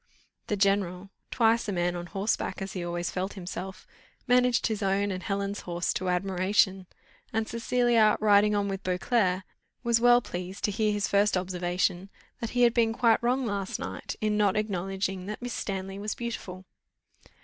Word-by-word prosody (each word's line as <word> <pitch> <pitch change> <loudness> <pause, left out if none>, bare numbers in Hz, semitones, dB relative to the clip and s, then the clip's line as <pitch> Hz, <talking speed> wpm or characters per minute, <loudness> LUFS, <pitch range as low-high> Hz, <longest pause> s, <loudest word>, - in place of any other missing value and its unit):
The 210 - 0
general, 195 -1 0 0.2
twice 230 -1 +2
a - - -1
man 175 -1 0
on 175 0 -5
horseback, 195 +4 -2
as 195 -1 -5
he 180 - -4
always 175 0 -3
felt 190 +2 -3
himself, 190 +1 -7 0.4
managed 250 -1 +3
his 220 -2 -1
own 200 +1 +1
and 185 -1 -4
Helen's 200 0 -2
horse 175 -1 -2
to 185 0 -2
admiration, 190 +1 +1 0.4
and 220 0 -1
Cecilia, 235 -2 +3
riding 210 0 +4
on 205 -1 +1
with 195 -1 -3
Beauclerc, 185 0 +1 0.4
was 235 -1 +2
well 245 0 +7
pleased 180 -4 -7
to 210 - +2
hear 215 +1 +1
his 205 -1 0
first 200 -1 +3
observation, 180 +1 -1 0.3
that 230 - -3
he 245 - +5
had 235 -1 +5
been 230 -2 +2
quite 230 -1 +3
wrong 250 +2 +1
last 200 -3 -2
night, 95 0 -5
in 215 -1 +1
not 205 -1 +2
acknowledging 195 -2 -2
that 210 - -5
Miss 245 -1 -5
Stanley 195 0 -4
was 210 +1 -3
beautiful. 190 -6 -6
200 Hz, 170 wpm, -28 LUFS, 185-220 Hz, 0.4 s, well